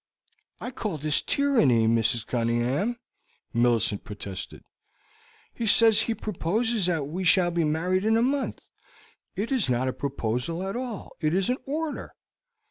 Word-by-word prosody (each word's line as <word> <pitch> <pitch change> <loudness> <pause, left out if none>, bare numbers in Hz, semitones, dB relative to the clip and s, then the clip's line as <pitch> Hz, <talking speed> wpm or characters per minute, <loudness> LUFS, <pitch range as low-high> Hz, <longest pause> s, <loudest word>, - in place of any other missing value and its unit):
"I 245 - -5
call 215 -9 -4
this 150 +1 +1
tyranny, 225 - +3
Mrs. 115 0 +1
Cunningham," 120 - 0 0.6
Millicent 120 -4 +1
protested. 100 -2 -7 0.9
"He 230 - -3
says 225 0 +6
he 230 - -1
proposes 215 +1 -1
that 165 -5 0
we 180 +6 -4
shall 180 0 +4
be 170 -1 +1
married 175 +5 0
in 220 +1 +3
a 230 - +3
month; 275 +2 -1 0.7
it 215 +6 -3
is 250 - +1
not 125 +1 +1
a 130 - -1
proposal 135 +5 -3
at 195 - -4
all, 245 -4 -5
it 155 +1 +1
is 195 +5 +1
an 255 - 0
order. 310 +2 -4
175 Hz, 145 wpm, -26 LUFS, -, 0.9 s, says